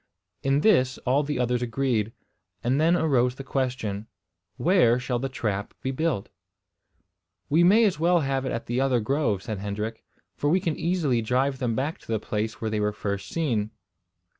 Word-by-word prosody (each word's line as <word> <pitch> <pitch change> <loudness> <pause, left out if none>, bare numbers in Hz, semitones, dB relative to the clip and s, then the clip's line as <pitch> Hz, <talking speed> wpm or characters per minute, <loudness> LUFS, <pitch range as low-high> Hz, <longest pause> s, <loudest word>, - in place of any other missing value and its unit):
In 135 +1 +2
this 130 -12 +3
all 130 +3 +3
the 150 -2 -2
others 125 0 0
agreed; 120 -3 0 0.5
and 130 +5 +2
then 165 +2 +4
arose 130 -7 +2
the 135 - -7
question. 125 -7 -2 0.5
Where 155 -10 +4
shall 125 -1 -2
the 135 +2 -2
trap 105 -6 -3
be 130 - -1
built? 155 -7 -1 1.2
"We 165 +4 +5
may 210 +6 +6
as 185 -7 +1
well 170 +1 +3
have 135 -2 -1
it 130 - -2
at 115 - -3
the 120 +2 -1
other 130 -3 +2
grove," 110 -4 0
said 110 -4 -4
Hendrik, 105 +3 -4 0.3
"for 145 - 0
we 180 +5 +4
can 165 -5 -1
easily 160 -9 +1
drive 130 +4 0
them 120 -4 0
back 140 +6 -2
to - - -20
the 110 - +1
place 110 +1 -3
where 110 -1 -2
they 110 - 0
were 105 0 +1
first 100 -1 -4
seen." 120 -11 0
130 Hz, 185 wpm, -26 LUFS, 110-145 Hz, 1.2 s, may